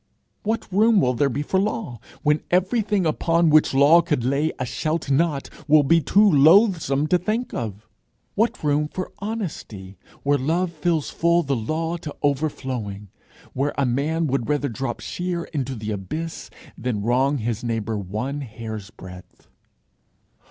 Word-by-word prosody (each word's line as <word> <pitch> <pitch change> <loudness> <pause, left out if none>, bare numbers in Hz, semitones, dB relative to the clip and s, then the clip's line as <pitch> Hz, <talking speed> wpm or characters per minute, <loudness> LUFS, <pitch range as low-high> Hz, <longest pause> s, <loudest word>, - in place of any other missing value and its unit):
What 220 +2 -2
room 215 +2 +5
will 125 -7 +2
there 140 +3 +1
be 140 +4 -2
for 190 +5 0
law, 200 - -2 0.2
when 150 0 +2
everything 195 +1 +1
upon 165 +1 +2
which 155 0 +5
law 145 +5 +6
could 150 -7 -1
lay 140 +5 +1
a 130 - -2
shalt 155 +3 -2
not 145 0 +1 0.2
will 150 0 +6
be 165 +4 +4
too 205 +8 +4
loathsome 160 -2 +4
to 180 +3 +2
think 220 +7 -2
of? 110 -1 -5 0.5
What 230 0 0
room 150 0 +1
for 185 +4 -6
honesty, 150 - -6 0.2
where 145 0 +2
love 170 +6 0
fills 160 -1 -1
full 170 +1 +2
the 140 -2 -1
law 160 +9 -2
to 155 -3 -8
overflowing 130 -8 -2 0.4
where 140 +3 -1
a 140 - +2
man 150 +7 0
would 135 -5 -1
rather 145 -1 0
drop 120 +1 -4
sheer 175 -1 -3
into 135 -3 -2
the 110 -1 -5
abyss, 130 - -5 0.3
than 115 -4 -3
wrong 130 +5 +2
his 115 -1 -3
neighbour 115 -2 -2
one 110 +10 -4
hair's 110 -4 -7
breadth? 90 -3 -13
145 Hz, 155 wpm, -23 LUFS, 120-170 Hz, 0.5 s, law